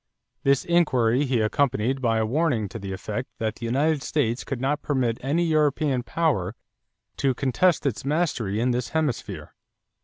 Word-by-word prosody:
This 135 0 +2
inquiry 135 -7 +3
he 125 -4 +1
accompanied 130 +2 +1
by 115 -3 +2
a 110 - +1
warning 125 -3 +1
to 115 - -7
the 100 -1 -6
effect 105 +6 -4
that 110 -1 -2
the 115 - -4
United 145 +5 +1
States 125 -5 -1
could 135 - -4
not 145 +3 0
permit 130 -5 0
any 150 +6 +1
European 150 -4 +2
power 120 - 0 0.6
to 135 -2 +1
contest 145 +7 +2
its 130 -6 -1
mastery 135 - 0
in 125 +2 +2
this 125 0 -2
hemisphere. 115 - -3
130 Hz, 160 wpm, -25 LUFS, 115-145 Hz, 0.6 s, inquiry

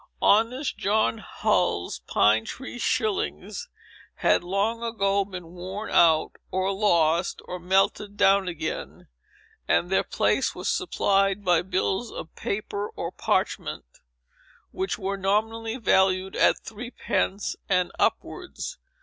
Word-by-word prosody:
Honest 245 +6 +2
John 215 +2 +1
Hull's 180 - 0
pine 110 +1 +4
tree 245 - -7
shillings 215 -4 -1 0.5
had - - +2
long 200 +6 0
ago 200 -4 +1
been 185 -4 -9
worn 185 +4 -6
out, 160 -2 +4
or 190 +1 0
lost, 175 -4 +2
or 180 - -6
melted 195 +3 +1
down 195 -1 +4
again, 160 -3 -5 0.6
and 175 - +2
their 190 - +3
place - - +1
was - - -5
supplied 195 0 +1
by 175 -2 +4
bills 190 +4 -1
of 160 - -8
paper 205 0 -3
or 170 - -4
parchment, - - -1 0.9
which 190 +1 -2
were 195 -1 -3
nominally 225 +4 0
valued 190 -4 +2
at - - +4
three 225 +3 -8
pence 200 -4 -1
and 180 -2 +2
upwards. 370 +7 -2
195 Hz, 120 wpm, -26 LUFS, 180-215 Hz, 0.9 s, pine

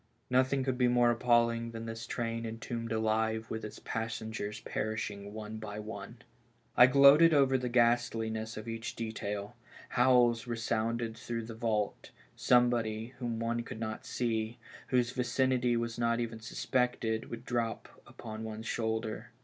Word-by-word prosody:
Nothing 130 +1 +3
could 130 -1 -1
be 125 - +5
more 120 -1 +4
appalling 115 -1 +2
than 115 0 -6
this 115 0 -6
train 115 -1 -2
entombed 115 +1 -5
alive 110 0 0
with 110 0 -4
its 105 - -7
passengers 110 -1 -4
perishing 105 -2 -3
one 110 0 -6
by 105 -1 -6
one. 105 +2 -7 0.6
I 125 - +9
gloated 140 +5 +7
over 135 -2 +4
the 125 -1 0
ghastliness 115 -2 +1
of 110 +1 -7
each 115 0 -5
detail; 105 -1 -4 0.3
howls 125 -1 +4
resounded 115 0 -1
through 115 0 -4
the 115 - -7
vault; 110 -2 -2 0.3
somebody, 120 -2 +2
whom 120 -3 -2
one 115 +1 -1
could 115 - -8
not 110 -1 -4
see, 115 -1 -1 0.3
whose 125 -2 +2
vicinity 125 -1 +1
was 115 0 -3
not 115 0 +2
even 115 -1 -3
suspected, 115 0 -1
would 115 +1 -7
drop 115 -2 -2 0.2
upon 110 -1 -8
one's 110 0 -6
shoulder. 110 -1 -2
115 Hz, 145 wpm, -32 LUFS, 110-120 Hz, 0.6 s, I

